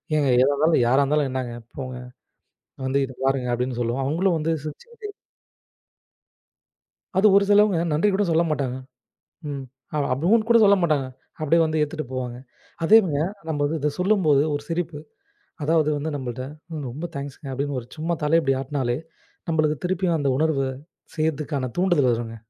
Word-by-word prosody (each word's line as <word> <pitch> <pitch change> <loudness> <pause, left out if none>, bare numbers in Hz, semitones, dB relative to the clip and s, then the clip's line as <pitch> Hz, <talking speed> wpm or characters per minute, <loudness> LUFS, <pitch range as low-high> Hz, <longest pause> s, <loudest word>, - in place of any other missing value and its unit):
ஏங்க 150 -2 +2
எதா 135 +2 +4
இருந்தாலும் 150 -2 +3
யாரா 130 +3 +4
இருந்தாலும் 145 0 +1
என்னங்க 130 -2 -3 0.2
போங்க 130 -2 -5 0.9
வந்து 135 +1 +1
இத 130 - -10
பாருங்க 135 -2 +1
அப்படின்னு 125 0 -2
சொல்லுவோம். 120 +3 -1
அவங்களும் 170 +4 +1
வந்து 160 +2 0
சிரிச்சிகிட்டே 420 - -9 2.1
அது 200 - +5
ஒரு 200 - +5
சிலவங்க 205 -3 +5
நன்றி 160 +8 +2
கூடச் 195 -2 +1
சொல்லமாட்டாங்க. 150 -6 0 0.7
ம். 140 -2 -5 0.3
அப்படின்னு 165 - +2
கூடச் 230 -2 +6
சொல்லமாட்டாங்க. 170 -9 +3 0.3
அப்படி 155 +1 +2
வந்து 155 -1 0
எடுத்துட்டு 150 0 -3
போவாங்க. 125 -2 -4 0.5
அதே 220 +6 +8
சமயம் 160 +3 -1 0.2
நம்ம 145 -2 0
இத 150 0 0
சொல்லும்போது 180 -8 +3
ஒரு 145 - -3
சிரிப்பு. 165 -3 -3 0.7
அதாவது 155 0 +2 0.3
நம்மள்ட 130 -2 -5 0.5
ரொம்ப 145 +8 -6
தேங்ஸ்ங்க. 140 +1 -7
அப்படின்னு 140 +1 -2
ஒரு 120 - -15
சும்மா 165 +2 -1
தலை 160 +3 +4 0.2
ஆட்டுனாலே 130 -3 -2 0.5
நம்மளுக்கு 155 -1 +1
திருப்பியும் 180 -2 +1
அந்த 140 - +1
உணர்வ 155 -2 +1 0.6
செய்யறதுக்கான 150 -4 -1
தூண்டுதல் 175 -9 +3
வருங்க. 115 -1 -3
150 Hz, 140 wpm, -23 LUFS, 135-170 Hz, 2.1 s, அதே